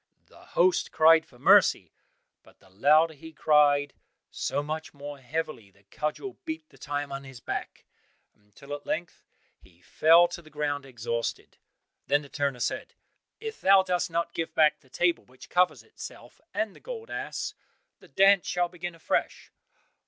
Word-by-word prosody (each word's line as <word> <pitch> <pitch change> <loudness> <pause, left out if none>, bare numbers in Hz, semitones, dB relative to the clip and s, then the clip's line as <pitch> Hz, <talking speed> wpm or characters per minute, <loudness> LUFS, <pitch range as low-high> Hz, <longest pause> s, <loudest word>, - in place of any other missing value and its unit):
The - - -19 0.2
host 180 +1 +3
cried 160 0 +5
for 125 - -20
mercy; - - +4 0.5
but - - -22
the 95 - -23
louder 150 - +4
he 160 +2 -12
cried, 145 -2 +3 0.4
so 145 - -2
much 155 +1 -5
more 145 0 -8
heavily 135 -5 -4
the 100 +1 -27
cudgel 155 - -4
beat 320 -2 -6
the - - -20
time 145 -1 -4
on 135 0 -5
his 135 -2 -11
back, - - -6 0.5
until 105 +8 -12
at 145 0 -7
length 170 +2 -4 0.4
he 85 -2 -23
fell 165 +2 +5
to 175 - -7
the 155 - -17
ground 145 -2 -3
exhausted. 115 -2 -4 0.5
Then 145 +2 +2
the 140 - -13
turner 140 -3 -2
said, - - -3 0.4
"If 445 -1 -7
thou 195 0 +6
dost 180 -2 -1
not 170 0 -2
give 165 - -4
back 155 -1 +4
the 130 - -26
table 175 +4 +1
which 130 +1 -16
covers 180 0 +2
itself, - - -12
and 215 -2 -2
the - - -15
gold 465 -2 -8
ass, - - -4 0.5
the - - -17
dance 195 -1 +4
shall 175 0 0
begin 175 -1 -7
afresh." 165 - -2
155 Hz, 165 wpm, -27 LUFS, 140-175 Hz, 0.5 s, thou